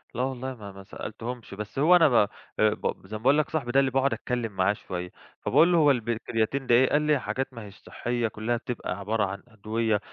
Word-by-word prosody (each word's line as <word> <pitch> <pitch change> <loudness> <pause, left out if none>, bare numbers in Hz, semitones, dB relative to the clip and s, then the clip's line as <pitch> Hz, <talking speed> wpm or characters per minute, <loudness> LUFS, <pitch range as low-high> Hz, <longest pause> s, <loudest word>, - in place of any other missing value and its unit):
لا 125 - -1
والله 130 0 -3
ما 105 -3 -9
ما 95 0 -12
سألتهمش، 115 +4 -7
بس 105 +5 -6
هو 165 +5 +6
أنا 165 -3 +6
ب - - -1
آآ 105 -3 +4 0.4
ب 110 - -4
زي 110 +2 -5
ما 110 - -14
باقول 135 +4 +5
لك 155 - +1
صاحبي 140 -7 -2
ده 135 - +4
اللي 135 -1 +2
باقعد 135 +1 +2
أتكلّم 120 -3 -3
معاه 95 +1 +2
شوية، 90 -3 -6 0.3
فباقول 170 +2 +4
له: 175 - +4
"هو 150 -3 +6
الب 120 -3 -2
الكرياتين 115 +3 -1
ده 120 - +5
إيه؟" 130 +2 +5
قال 150 - +3
لي: 150 -2 +2
"حاجات 135 +1 -3
ما 115 -2 -8
هيش 100 0 -13
صحّية 120 -1 -3
كُلّها 110 +2 -2
بتبقى 115 -5 -5
عبارة 105 +2 0
عن 95 0 -6
أدوية 110 -1 -1
120 Hz, 235 wpm, -27 LUFS, 105-135 Hz, 0.4 s, هو